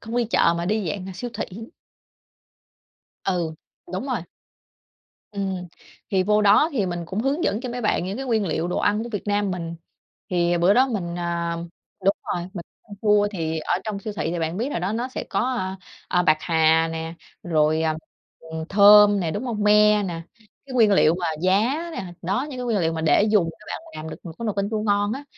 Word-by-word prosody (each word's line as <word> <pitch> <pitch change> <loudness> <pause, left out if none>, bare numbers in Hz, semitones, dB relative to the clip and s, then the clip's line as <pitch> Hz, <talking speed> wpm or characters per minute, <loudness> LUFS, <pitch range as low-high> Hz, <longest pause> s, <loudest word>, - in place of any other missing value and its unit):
không 225 +1 -5
đi 245 - +2
chợ 210 -6 +3
mà 170 - -2
đi 210 -2 0
dạng 190 +2 -5
siêu 240 +7 -5
thị. - - -2 1.8
Ừ, 175 -4 -1 0.4
đúng 195 +9 -3
rồi. 250 -8 -1 1.1
Ừm, 190 -3 -3 0.4
thì 190 -2 +2
vô 210 +2 +2
đó 210 +10 +5
thì 215 -8 0
mình 175 -1 -3
cũng 195 +4 -3
hướng 275 +6 0
dẫn 210 - 0
cho 255 - -5
mấy 245 - -4
bạn 210 -5 +1
những 225 +9 -4
nguyên 220 -4 +1
liệu 165 +1 -1
đồ - - -1
ăn 210 +2 +1
của 235 - -6
Việt 205 - -3
Nam 205 -1 +1
mình. 170 -2 -4 0.6
Thì 175 -1 +2
bữa 180 +4 +4
đó 260 +3 +4
mình, 175 -7 -3
à 170 -1 -2 0.5
đúng 195 - +3 0.2
rồi, 175 +1 -4
mình 170 - -6 0.4
mua 210 -1 +4
thì 160 -5 -2
ở 155 - -1
trong 210 -2 -3
siêu 210 +1 -5
thị 160 - -1
thì 175 - -2
bạn 165 +2 -2
biết 245 +7 -2
rồi - - -2
đó, 185 +4 -1
nó 240 +3 -2
sẽ 260 - -5
có, - - +1
a, 190 -7 -2 0.3
à, 180 - +2
bạc 155 -3 +4
hà 160 0 +3
nè, 160 0 -5 0.3
rồi, 155 -1 +2
à, 160 -1 +1 0.4
ừm, 160 0 -7
thơm 205 0 +7
nè, 165 - -1
đúng 205 +8 -3
hông? 225 -4 -2
Me 210 0 +5
nè, 170 -4 -4 0.2
cái 245 +4 -14
nguyên 225 -4 +5
liệu 165 -4 +5
mà 175 -1 -3 0.2
giá 240 - +1
nè. 195 - -4 0.2
Đó, 195 +10 -1
những 260 - -7
cái 250 - -3
nguyên 230 -4 +1
liệu 165 -3 +1
mà 160 - -3
để 160 +5 +4
dùng 185 -6 +3
các 210 - -18
bạn - - -4 0.2
làm 155 +1 -6
được 155 - -7
một 170 - -7
cái 230 - -4
nồi 210 - -1
canh 200 +1 -1
chua 215 - -1
ngon 205 0 +1
á. 275 +4 -5
195 Hz, 220 wpm, -23 LUFS, 170-215 Hz, 1.8 s, thơm